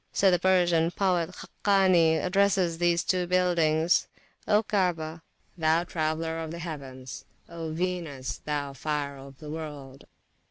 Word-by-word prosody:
So 195 Hz, -1 st, +3 dB
the 180 Hz, -, +3 dB
Persian 175 Hz, -3 st, +3 dB
poet 180 Hz, -2 st, 0 dB
Khakani 185 Hz, -4 st, +2 dB
addresses 185 Hz, -3 st, +1 dB
these 175 Hz, 0 st, +2 dB
two 180 Hz, -1 st, 0 dB
buildings: 170 Hz, -2 st, +2 dB, 0.4 s
O 210 Hz, +1 st, +4 dB
Kaabah, 170 Hz, -6 st, -1 dB, 0.3 s
thou 160 Hz, 0 st, +2 dB
traveller 160 Hz, -1 st, -2 dB
of 160 Hz, -1 st, -5 dB
the 170 Hz, -, -6 dB
heavens! 135 Hz, -6 st, -7 dB, 0.2 s
O 165 Hz, -1 st, -6 dB
Venus, 165 Hz, -6 st, -3 dB
thou 145 Hz, -2 st, -3 dB
fire 145 Hz, 0 st, -3 dB
of 135 Hz, 0 st, -12 dB
the 150 Hz, 0 st, -9 dB
world! 145 Hz, -4 st, -8 dB
165 Hz, 130 wpm, -27 LUFS, 155-180 Hz, 0.4 s, O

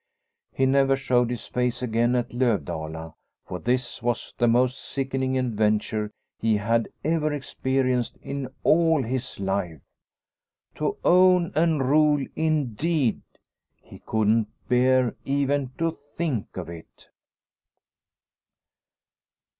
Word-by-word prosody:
He 135 Hz, -, +1 dB
never 135 Hz, 0 st, +4 dB
showed 125 Hz, -3 st, +1 dB
his 120 Hz, -1 st, -4 dB
face 125 Hz, 0 st, -1 dB
again 120 Hz, +1 st, +1 dB
at 120 Hz, -1 st, -1 dB
Lovdala, 80 Hz, -, -2 dB, 0.3 s
for 90 Hz, -, -6 dB
this 125 Hz, +2 st, -1 dB
was 120 Hz, 0 st, -2 dB
the 120 Hz, -, +2 dB
most 125 Hz, +2 st, +2 dB
sickening 130 Hz, -1 st, -2 dB
adventure 110 Hz, -3 st, 0 dB, 0.3 s
he 110 Hz, -2 st, +2 dB
had 115 Hz, +2 st, 0 dB
ever 155 Hz, -1 st, +1 dB
experienced 130 Hz, -3 st, -1 dB
in 140 Hz, -2 st, -5 dB, 0.2 s
all 160 Hz, -3 st, +4 dB
his 130 Hz, 0 st, -4 dB
life. 95 Hz, -6 st, -2 dB, 0.9 s
To -, -, -2 dB
own 180 Hz, -1 st, +5 dB
and 155 Hz, -4 st, +2 dB
rule 150 Hz, -1 st, +3 dB
indeed! 155 Hz, -3 st, 0 dB, 0.6 s
He -, -, -14 dB
couldn't 110 Hz, 0 st, +1 dB, 0.2 s
bear 125 Hz, 0 st, +3 dB
even 140 Hz, -1 st, 0 dB
to 165 Hz, 0 st, +1 dB, 0.3 s
think 145 Hz, -, -2 dB
of 90 Hz, -3 st, -5 dB
it. 85 Hz, -1 st, -12 dB
125 Hz, 110 wpm, -25 LUFS, 115-140 Hz, 0.9 s, own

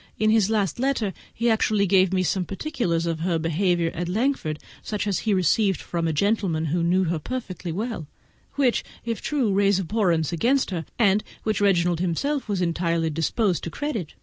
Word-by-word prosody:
In 215 Hz, +1 st, +3 dB
his 215 Hz, -2 st, +3 dB
last 210 Hz, -4 st, 0 dB
letter 245 Hz, -7 st, 0 dB, 0.2 s
he 235 Hz, -, -1 dB
actually 215 Hz, -2 st, +2 dB
gave 190 Hz, -1 st, +4 dB
me 185 Hz, -1 st, +1 dB
some 185 Hz, +1 st, 0 dB
particulars 185 Hz, -, -2 dB
of 165 Hz, -1 st, -2 dB
her 170 Hz, 0 st, 0 dB
behaviour 165 Hz, +1 st, +1 dB
at 175 Hz, +1 st, -3 dB
Langford, 215 Hz, -, 0 dB, 0.2 s
such 210 Hz, -1 st, -3 dB
as 200 Hz, -4 st, 0 dB
he 220 Hz, -, -1 dB
received 190 Hz, +1 st, +2 dB
from 170 Hz, -1 st, -2 dB
a -, -, +1 dB
gentleman 180 Hz, -1 st, +1 dB
who 175 Hz, -, +1 dB
knew 180 Hz, +3 st, +2 dB
her 170 Hz, -2 st, -1 dB
perfectly 185 Hz, -4 st, -5 dB
well, 205 Hz, -3 st, -4 dB, 0.5 s
which, 265 Hz, -4 st, +2 dB, 0.2 s
if 230 Hz, -1 st, -3 dB
true, 275 Hz, -7 st, 0 dB
must 195 Hz, -, +1 dB
raise 200 Hz, -1 st, +3 dB
abhorrence 175 Hz, -5 st, +1 dB
against 245 Hz, -, +1 dB
her, 165 Hz, -4 st, -3 dB
and 210 Hz, -2 st, +3 dB, 0.2 s
which 215 Hz, -1 st, 0 dB
Reginald 175 Hz, -4 st, +3 dB
himself 235 Hz, -, -1 dB
was 195 Hz, -3 st, 0 dB
entirely 170 Hz, -1 st, 0 dB
disposed 175 Hz, +4 st, 0 dB
to -, -, -3 dB
credit. 220 Hz, -, -4 dB
190 Hz, 185 wpm, -24 LUFS, 170-220 Hz, 0.5 s, gave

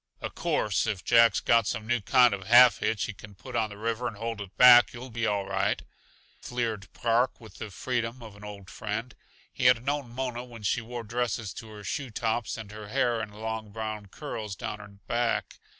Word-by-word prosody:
"Uh -, -, -4 dB
course, 105 Hz, -3 st, 0 dB
if 95 Hz, -3 st, -2 dB
Jack's 115 Hz, -3 st, +5 dB
got 115 Hz, -2 st, +3 dB
some 110 Hz, -3 st, -2 dB
new 120 Hz, 0 st, +1 dB
kind 125 Hz, +1 st, +5 dB
of 95 Hz, -1 st, -5 dB
half 120 Hz, +2 st, +8 dB
hitch 110 Hz, -2 st, 0 dB
he 105 Hz, -, -5 dB
can 100 Hz, 0 st, -13 dB
put 125 Hz, +6 st, -10 dB
on 110 Hz, -2 st, +1 dB
the 100 Hz, -, -10 dB
river 115 Hz, +3 st, -2 dB
and 110 Hz, -4 st, -6 dB
hold 115 Hz, 0 st, -4 dB
it 100 Hz, -2 st, -10 dB
back 120 Hz, -3 st, +8 dB
yuh'll 125 Hz, +1 st, -8 dB
be 115 Hz, 0 st, -1 dB
all 100 Hz, -1 st, 0 dB
right," 95 Hz, +1 st, 0 dB, 0.6 s
fleered 115 Hz, -6 st, -3 dB
Park, 120 Hz, +2 st, +1 dB
with 110 Hz, -5 st, -14 dB
the 110 Hz, -, -5 dB
freedom 120 Hz, +3 st, -3 dB
of 110 Hz, -3 st, -11 dB
an 100 Hz, -, -14 dB
old 100 Hz, -2 st, -9 dB
friend. 110 Hz, +5 st, -4 dB, 0.4 s
He -, -, -2 dB
had 125 Hz, -1 st, +5 dB
known 140 Hz, -3 st, -1 dB
Mona 125 Hz, 0 st, -4 dB
when 120 Hz, -3 st, -12 dB
she 100 Hz, +3 st, +1 dB
wore 120 Hz, +1 st, -6 dB
dresses 115 Hz, -3 st, -2 dB
to 115 Hz, -, -9 dB
her 105 Hz, -1 st, -10 dB
shoe 130 Hz, +7 st, -3 dB
tops 115 Hz, 0 st, -2 dB
and 110 Hz, -2 st, -8 dB
her 105 Hz, -1 st, -9 dB
hair 120 Hz, -1 st, +1 dB
in 105 Hz, -, -5 dB
long, 110 Hz, 0 st, -5 dB
brown 110 Hz, -1 st, -5 dB
curls 110 Hz, -, -6 dB
down 105 Hz, +2 st, -5 dB
her 105 Hz, -, -10 dB, 0.2 s
back. 120 Hz, 0 st, -1 dB
115 Hz, 215 wpm, -28 LUFS, 105-120 Hz, 0.6 s, half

